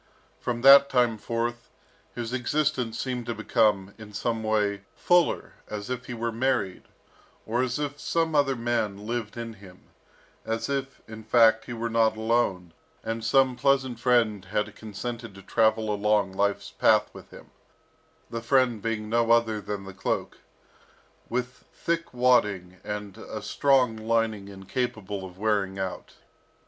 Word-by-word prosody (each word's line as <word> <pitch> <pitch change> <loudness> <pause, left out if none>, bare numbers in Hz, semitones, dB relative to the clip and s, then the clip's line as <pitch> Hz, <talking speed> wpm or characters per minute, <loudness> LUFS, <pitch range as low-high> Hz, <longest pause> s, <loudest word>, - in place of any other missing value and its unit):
From 120 -1 -3
that 140 +1 +9
time 120 -4 +2
forth, 120 +2 -3 0.5
his 120 0 -4
existence 130 -2 0
seemed 125 -3 -3
to 120 - -2
become, 105 -3 +1
in 105 -1 -11
some 115 +1 -1
way, 105 -2 0
fuller, 175 -2 +2
as 105 +3 -6
if 125 0 -4
he 125 - -5
were 115 0 -2
married, 115 -5 -1 0.6
or 120 +3 0
as 125 -1 -1
if 145 -1 -4
some 165 0 0
other 140 -2 +3
man 115 -4 -2
lived 115 -1 -4
in 115 -1 -5
him, 95 -3 -16 0.5
as 115 +4 -3
if, 135 -1 -3
in 110 0 -9
fact, 110 0 +4
he 120 - -6
were 115 0 -3
not 115 -1 +2
alone, 110 -7 0 0.3
and 115 0 -3
some 130 +2 +3
pleasant 130 -2 +1
friend 115 -5 +2
had 105 +2 -2
consented 115 0 -6
to 95 - -12
travel 110 0 +2
along 105 -1 +1
life's 100 +1 -1
path - - +3
with - - -12
him, - - -14 0.8
the 115 - -3
friend 120 -2 +2
being 110 -1 -2
no 115 +1 +1
other 115 -2 +3
than 100 0 -5
the 95 0 -9
cloak, - - -3 0.9
with 125 +1 -4
thick 170 0 -2
wadding 105 -8 +2
and 105 0 -6
a 110 - -6
strong 135 -5 +3
lining 110 -2 0
incapable 100 0 -4
of 90 -1 -10
wearing 100 -2 0
out. 95 -1 -5
115 Hz, 150 wpm, -26 LUFS, 105-125 Hz, 0.9 s, that